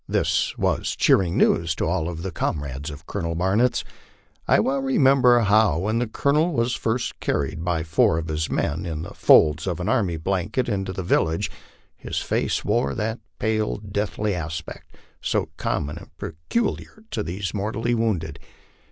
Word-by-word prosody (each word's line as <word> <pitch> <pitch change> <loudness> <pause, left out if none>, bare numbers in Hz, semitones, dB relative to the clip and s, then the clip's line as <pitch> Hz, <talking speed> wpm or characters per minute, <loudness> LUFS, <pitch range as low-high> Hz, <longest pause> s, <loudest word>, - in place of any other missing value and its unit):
This - - +1
was - - 0
cheering 90 -3 +3
news 80 -1 +3
to - - -1
all 80 +2 -1
the 85 +4 -5
comrades 70 -2 -3
of 75 +2 -10
Colonel 85 -4 -3
Barnitz. 100 +8 +2 0.6
I - - +5
well 135 0 +1
remember 135 -2 +4
how, 105 -5 +4
when 110 +6 0
the 120 - 0
Colonel 150 +9 +1
was 120 -1 +1
first 115 +2 -2
carried 75 +3 -1
by 85 -2 0
four 80 0 +3
of 80 0 -3
his 80 0 -2
men, 80 +3 -1
in 80 -2 -4
the - - -8
folds 75 +3 +5
of 90 -4 -2
an 90 - -3
army 105 -9 +1
blanket, 95 +8 -1
into 95 -4 -2
the 95 - -4
vil 85 - +3
lage, 80 +1 -2 0.4
his - - -6
face - - -1
wore 115 +5 +1
that 110 0 -2 0.2
pale 110 -1 0
deathly 105 0 -2
aspect 80 -2 -6 0.3
so - - 0
common 75 0 -2
and - - -16
peculiar 215 - -3
to - - -1
those 95 +5 -4
mortally 110 +3 -1
wounded. 110 -9 -1
95 Hz, 165 wpm, -24 LUFS, 80-115 Hz, 0.6 s, I